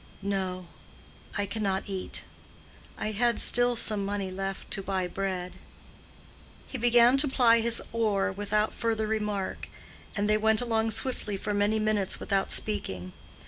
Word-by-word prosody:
"No; 190 -2 -2 0.7
I 205 - 0
cannot 200 -2 -2
eat. 190 -2 -3 0.7
I 215 - -2
had 235 +3 +1
still 245 0 +5
some 215 -3 0
money 200 -1 -3
left 195 +1 -5
to 195 - +1
buy 190 -1 -2
bread." 185 -1 -4 1.1
He 265 - -6
began 240 +2 +5
to 290 +2 +4
ply 240 -3 +4
his 230 0 +2
oar 215 -4 +1
without 205 +2 -1
further 225 -2 -1
remark, 210 -3 -3 0.5
and 205 0 0
they 215 0 +3
went 220 0 +3
along 225 -2 +1
swiftly 220 -2 -1
for 210 - -3
many 205 +2 +2
minutes 215 -3 0
without 195 -1 0
speaking. 95 - -3
210 Hz, 140 wpm, -28 LUFS, 195-225 Hz, 1.1 s, still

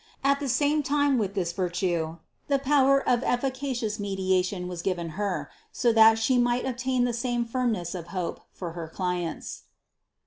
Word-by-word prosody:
At 280 0 +3
the 285 -2 -3
same 290 +5 +2
time 285 -2 +2
with 200 -2 -2
this 175 -3 0
virtue 175 -3 -1 0.3
the 280 - +3
power 275 0 +3
of 245 -1 +3
efficacious 255 -4 -1
medi 195 -2 -1
ation 180 0 0
was 180 -2 -5
given 175 -2 -2
Her, 175 -4 -3 0.2
so 240 -2 +2
that 225 0 +7
She 245 +3 +2
might 240 0 +1
obtain 255 0 0
the 245 -1 0
same 240 0 -1
firmness 230 -8 -1
of 175 -3 -6
hope 180 -2 -4
for 175 -3 -6
her 165 -1 -6
clients. 180 -1 -4
225 Hz, 170 wpm, -27 LUFS, 180-255 Hz, 0.3 s, that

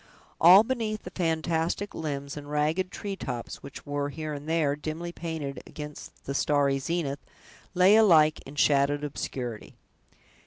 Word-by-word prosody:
All 185 +5 +9
beneath 225 -3 -2
the 180 - -8
fantastic 165 +2 -1
limbs 140 -3 -4
and 145 -1 -8
ragged 155 +5 0
tree 200 0 -5
tops, 125 -9 -5
which 140 - -10
were, 145 0 -2
here 155 +1 -5
and 145 +2 -7
there, 155 -4 +2
dimly 155 +3 -5
painted 160 -5 -5
against 150 -1 -10
the 140 - -3
starry 140 -1 +2
zenith, 145 -2 -2 0.5
lay 185 +3 +6
alike 160 -8 +5
in 140 - -10
shadowed 145 0 +3
obscurity. 125 -5 -5
150 Hz, 145 wpm, -27 LUFS, 140-170 Hz, 0.5 s, All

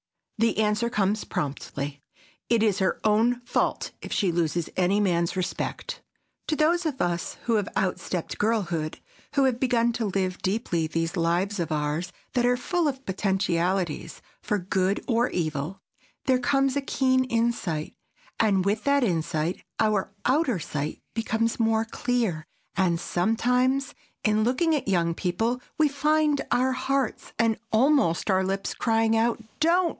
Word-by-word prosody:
The 230 0 +2
answer 215 +2 +1
comes 210 -1 0
promptly: 140 0 -4 0.5
It 230 -2 +3
is 205 -2 +2
her 190 -1 +1
own 225 +3 +3
fault 240 - -1
if - - -8
she 195 -5 +2
loses 170 0 -1
any 185 +3 +2
man's 170 -4 +1
respect. 185 -1 -3 0.5
To 310 - +1
those 335 +4 +2
of 275 -4 -4
us 175 -4 -1
who 230 -2 +2
have 205 -1 -1
outstepped 180 -2 -2
girlhood, 175 -8 0 0.4
who 280 - +4
have 255 -3 +2
begun 235 -2 +2
to 230 -2 -1
live 185 -2 -1
deeply 185 -5 0
these 165 +2 -2
lives 180 +4 0
of 165 -1 -2
ours 155 +4 -1 0.2
that 245 -2 +2
are 245 0 +3
full 345 +5 0
of 270 -1 -3
potentialities 190 -3 -1 0.2
for 210 - 0
good 190 +1 0
or 240 0 +2
evil, 155 +2 -2 0.5
there 260 -2 +3
comes 275 +1 +2
a 285 - +1
keen 260 -1 +2
insight, 230 -10 -1 0.5
and, 195 -4 +3
with 210 +2 0
that 280 -1 +3
insight, 165 -3 -1 0.2
our 215 -3 +1
outer 260 - +2
sight 150 -2 -4
becomes 225 0 0
more 225 0 +2
clear; 230 -9 -1 0.3
and, 175 -3 +2
sometimes, 250 +9 +1 0.3
in 215 0 +3
looking 315 +8 +2
at 290 -7 -1
young 170 -3 +2
people, 225 +9 -1 0.2
we 310 - +5
find 300 +1 +2
our 255 +1 +2
hearts, 270 +1 -1
and 230 -1 +2
almost 225 - +3
our 190 0 +3
lips, 195 +1 -2
crying 225 -1 +2
out, 230 +1 +2 0.2
"DON'T!" 340 +3 +3
215 Hz, 150 wpm, -26 LUFS, 180-250 Hz, 0.5 s, we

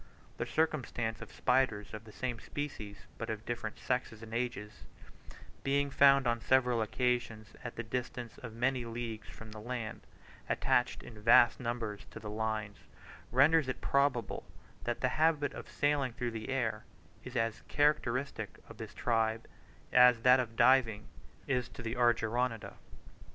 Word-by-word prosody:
The - - -2
circumstance 125 -8 -1
of - - -9
spiders 110 -7 +1
of 110 +1 -7
the 110 - -12
same 120 +1 -3
species, 110 -10 -6
but 115 - -4
of 110 0 -4
different 115 -2 -4
sexes 120 -3 -2
and 110 0 -9
ages, 115 -4 -3 0.8
being 140 +1 +1
found 135 0 +6
on 120 -1 +1
several 125 -2 +3
occasions 115 -2 -1
at 120 - -6
the 115 - -4
distance 120 0 -5
of 115 - -7
many 125 +1 +1
leagues 115 -1 -5
from 110 -1 -11
the 110 - -8
land, 115 -1 -5 0.5
attached 125 - +1
in 110 -3 -11
vast 115 +1 +6
numbers 115 -4 -4
to - - -9
the 105 -1 -7
lines, 110 -3 -3 0.5
renders 145 +4 +5
it 130 - -3
probable 140 -4 +1 0.4
that 120 0 -2
the 125 - +2
habit 155 -3 +3
of - - -9
sailing 145 -4 +1
through 120 0 -3
the 110 +2 -6
air 115 -5 -1 0.4
is 125 +1 -9
as 115 -2 0
characteristic 135 -6 0
of - - -12
this - - -8
tribe, 115 -1 0 0.5
as 125 -2 +7
that 125 +1 +7
of 115 -3 -3
diving 120 -3 +4 0.4
is 125 -3 0
of - - -18
the 115 0 -2
Argyroneta. 120 -1 +1
120 Hz, 155 wpm, -32 LUFS, 110-130 Hz, 0.8 s, as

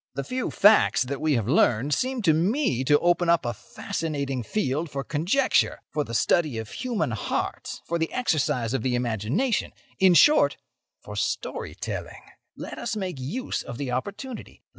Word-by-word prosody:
The 140 - -2
few 255 - -3
facts 210 -8 +5
that 135 +3 -5
we 155 -1 +2
have 115 -5 0
learned 130 -1 +3
seem 255 - -1
to 160 -5 +5
me 175 - +1
to 145 +2 +5
open 175 +1 +2
up 170 -4 +3
a 120 - -1
fascinating 140 +2 -4
field 150 - -2
for 140 -1 -4
conjecture, 180 - +1
for 150 0 -1
the 115 -3 -6
study 150 -1 +2
of 110 -1 -6
human 235 - -2
hearts, 110 - -3
for 170 0 -2
the 160 - -1
exercise 145 - 0
of 135 - 0
the 125 +1 0
imagination—in 150 - 0
short, 300 - +5 0.5
for - - -8
story - - -3
telling. - - -6 0.3
Let - - -7
us - - -3
make 185 -8 -4
use 210 - -3
of 120 - -8
the 135 -2 -3
opportunity. 205 - -6
150 Hz, 165 wpm, -25 LUFS, 130-200 Hz, 0.5 s, facts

